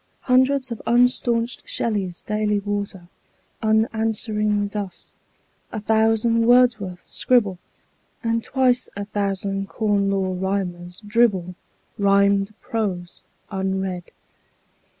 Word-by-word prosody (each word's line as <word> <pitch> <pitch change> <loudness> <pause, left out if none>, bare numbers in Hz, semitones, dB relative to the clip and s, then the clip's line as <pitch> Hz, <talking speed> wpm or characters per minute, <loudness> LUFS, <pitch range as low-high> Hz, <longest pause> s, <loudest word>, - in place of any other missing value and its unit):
Hundreds 260 0 +2
of 230 - -5
unstaunched 240 -1 +2
Shelleys 195 -6 -2
daily 210 0 0
water 200 -3 -4 0.5
Unanswering 220 -1 +1
dust; 200 -3 -6 0.6
a 220 - -3
thousand 225 +2 +2
Wordsworths 230 -7 +3
scribble; 210 -8 +1 0.6
And 230 0 0
twice 255 -2 +1
a 200 0 -4
thousand 195 -1 -2
Corn 205 -2 +1
Law 190 -1 0
Rhymers 180 -1 -3
dribble 205 -5 +2 0.5
Rhymed 200 0 +3
prose, 190 -6 -4 0.2
unread. 190 -2 -2
205 Hz, 90 wpm, -22 LUFS, 195-230 Hz, 0.6 s, Wordsworths